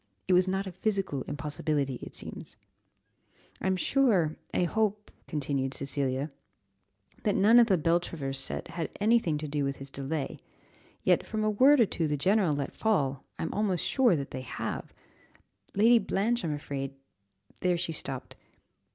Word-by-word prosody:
"It 185 Hz, -, +3 dB
was 180 Hz, +1 st, +5 dB
not 190 Hz, +1 st, 0 dB
a 190 Hz, -, -5 dB
physical 190 Hz, -6 st, -1 dB
impossibility, 145 Hz, -2 st, -2 dB
it -, -, -8 dB
seems." -, -, -6 dB, 1.0 s
"I'm 190 Hz, 0 st, +1 dB
sure 190 Hz, -, +2 dB, 0.2 s
I -, -, +1 dB
hope," 210 Hz, +2 st, 0 dB, 0.2 s
continued 135 Hz, -3 st, -1 dB
Cecilia, 140 Hz, +1 st, -1 dB, 0.9 s
"that 205 Hz, -, +1 dB
none 225 Hz, +5 st, +6 dB
of 235 Hz, -, +6 dB
the 190 Hz, -4 st, +4 dB
Beltravers' 160 Hz, -4 st, 0 dB
set 135 Hz, -, -2 dB
had 165 Hz, -2 st, -3 dB
any 225 Hz, +3 st, +5 dB
thing 160 Hz, -8 st, -1 dB
to 150 Hz, +1 st, -4 dB
do 145 Hz, 0 st, -1 dB
with 140 Hz, 0 st, -1 dB
his 135 Hz, 0 st, -7 dB
delay, 140 Hz, +1 st, -3 dB, 0.6 s
yet -, -, +4 dB
from 215 Hz, -1 st, -3 dB
a 215 Hz, -, +2 dB
word 265 Hz, +7 st, +6 dB
or 230 Hz, -, +7 dB
two 165 Hz, -4 st, -1 dB
the 150 Hz, 0 st, 0 dB
general 185 Hz, 0 st, +3 dB
let 140 Hz, -1 st, -3 dB
fall, 140 Hz, -12 st, 0 dB
I'm 160 Hz, -, -3 dB
almost 200 Hz, -5 st, 0 dB
sure 250 Hz, -8 st, +4 dB
that 140 Hz, -3 st, -4 dB
they 130 Hz, -, -4 dB
have 130 Hz, -, -5 dB, 0.8 s
Lady 230 Hz, +4 st, +6 dB
Blanche, 225 Hz, +4 st, 0 dB
I'm 160 Hz, -, -1 dB
afraid 140 Hz, -2 st, -5 dB, 0.3 s
." 100 Hz, 0 st, -34 dB
There 180 Hz, -1 st, +2 dB
she 170 Hz, -1 st, -2 dB
stopped. 135 Hz, -4 st, -5 dB
165 Hz, 165 wpm, -29 LUFS, 140-205 Hz, 1.0 s, or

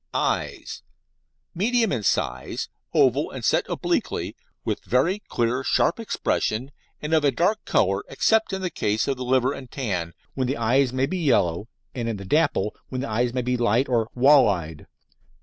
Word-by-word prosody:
EYES -, -, -2 dB, 0.7 s
Medium 225 Hz, +5 st, +1 dB
in 125 Hz, -5 st, -1 dB
size, 65 Hz, -10 st, -1 dB, 0.2 s
oval, -, -, +3 dB
and -, -, -6 dB
set -, -, +2 dB
obliquely, -, -, -2 dB, 0.3 s
with -, -, -2 dB
very 165 Hz, -, +1 dB
clear, 120 Hz, +2 st, 0 dB
sharp 170 Hz, -, +2 dB
expression 135 Hz, -, -1 dB, 0.3 s
and 150 Hz, +2 st, -2 dB
of 155 Hz, -2 st, +4 dB
a 145 Hz, -, +5 dB
dark 175 Hz, -, 0 dB
colour, 95 Hz, 0 st, +1 dB
except 220 Hz, +11 st, +2 dB
in 190 Hz, 0 st, -3 dB
the 180 Hz, -, -2 dB
case 105 Hz, +1 st, 0 dB
of 140 Hz, -, 0 dB
the 125 Hz, -, -5 dB
liver 130 Hz, +1 st, +2 dB
and 130 Hz, -3 st, -9 dB
tan, 90 Hz, -12 st, -3 dB, 0.2 s
when 130 Hz, -2 st, -1 dB
the 130 Hz, -, -1 dB
eyes 125 Hz, +3 st, +2 dB
may 130 Hz, +1 st, +1 dB
be 185 Hz, +6 st, -3 dB
yellow; 100 Hz, -, +1 dB, 0.3 s
and 120 Hz, -2 st, -3 dB
in 110 Hz, -, -3 dB
the 100 Hz, -, -8 dB
dapple, 105 Hz, -, +1 dB
when 130 Hz, -1 st, -3 dB
the 135 Hz, -, -3 dB
eyes 120 Hz, +2 st, 0 dB
may 125 Hz, 0 st, -2 dB
be 125 Hz, +1 st, 0 dB
light 120 Hz, +2 st, +2 dB
or 115 Hz, -3 st, +1 dB
"wall 135 Hz, -1 st, +6 dB
eyed." 80 Hz, -5 st, -4 dB
125 Hz, 180 wpm, -24 LUFS, 110-145 Hz, 0.7 s, wall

